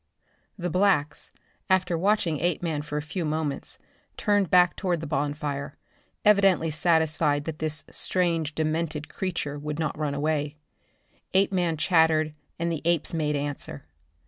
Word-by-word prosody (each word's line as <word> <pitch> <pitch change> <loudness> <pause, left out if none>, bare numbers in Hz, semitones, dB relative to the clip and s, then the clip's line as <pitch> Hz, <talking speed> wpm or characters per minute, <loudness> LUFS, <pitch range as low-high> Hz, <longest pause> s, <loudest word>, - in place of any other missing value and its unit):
The 180 -2 -3
blacks, 180 -6 +2 0.4
after 185 -2 +2
watching 175 -4 +1
Apeman 165 -3 0
for 150 0 -4
a 150 - -2
few 170 +3 -4
moments 155 -2 -2 0.4
turned 205 -4 +2
back 180 -1 +5
toward 180 -4 -1
the 160 - -5
bonfire, 145 -1 -2 0.5
evidently 195 -6 +4
satisfied 155 -2 +2
that 160 -1 -5
this 155 -1 -2
strange 165 -4 0
demented 155 -1 -1
creature 160 -6 -3
would 150 0 -4
not 160 -1 -1
run 150 -2 -2
away. 150 0 -1 0.8
Apeman 185 -4 +2
chattered 160 -2 +3 0.2
and 170 0 -1
the 160 - -3
apes 170 -1 +1
made 150 -2 0
answer. 140 - -4
160 Hz, 135 wpm, -26 LUFS, 150-175 Hz, 0.8 s, back